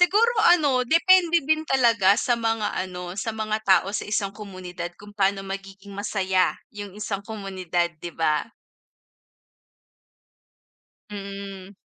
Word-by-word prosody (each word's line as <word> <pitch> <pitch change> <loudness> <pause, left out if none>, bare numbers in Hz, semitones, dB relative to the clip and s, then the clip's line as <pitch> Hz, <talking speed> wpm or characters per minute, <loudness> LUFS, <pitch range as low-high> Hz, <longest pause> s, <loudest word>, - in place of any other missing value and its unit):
Siguro 420 +7 +4 0.2
ano, 280 -7 +3
depende 340 0 +5
din 315 +2 +1
talaga 230 -7 +4
sa 240 - +2
mga 225 -2 0
ano, 180 -1 -4
sa 225 +3 -2
mga 215 0 -1
tao 190 0 +4
sa 205 - -2
isang 200 -2 -1
komunidad 180 -4 -7
kung 205 0 -12
paano 195 -1 +2
magiging 195 +1 -8
masaya 190 -2 +1 0.2
'yung 205 -2 -7
isang 210 -2 -3
komunidad, 185 -5 -2
'di 175 - -6
ba. 155 +3 +1 2.6
Mm. 200 -1 -8
200 Hz, 120 wpm, -24 LUFS, 190-225 Hz, 2.6 s, depende